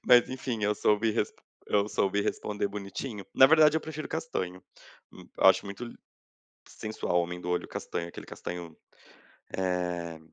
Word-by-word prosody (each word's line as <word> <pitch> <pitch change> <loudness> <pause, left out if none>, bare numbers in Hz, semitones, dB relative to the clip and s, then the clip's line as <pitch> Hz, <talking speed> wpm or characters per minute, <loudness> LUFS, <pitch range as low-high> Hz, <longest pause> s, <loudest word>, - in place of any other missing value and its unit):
Mas 120 -1 +7
enfim 125 -4 -2
eu 105 0 +2
soube 105 +2 +3
res 105 -2 0 0.3
eu 105 0 +2
soube 100 0 +1
responder 105 0 -1
bonitinho. 100 +2 -5
Na 130 - +9
verdade, 155 0 +6
eu - - +1
prefiro 155 -1 -6
castanho. 95 - -3 0.5
Hum, - - -13
eu - - 0
acho - - +6
muito 100 +5 -6
li 120 - -9 0.7
sensual 110 -5 -1
homem 90 +1 -4
do 90 - -4
olho 90 - 0
castanho, 85 - -4
aquele - - -9
castanho, 85 -2 -7 0.8
eh, 90 -3 -1
100 Hz, 155 wpm, -29 LUFS, 90-120 Hz, 0.8 s, Na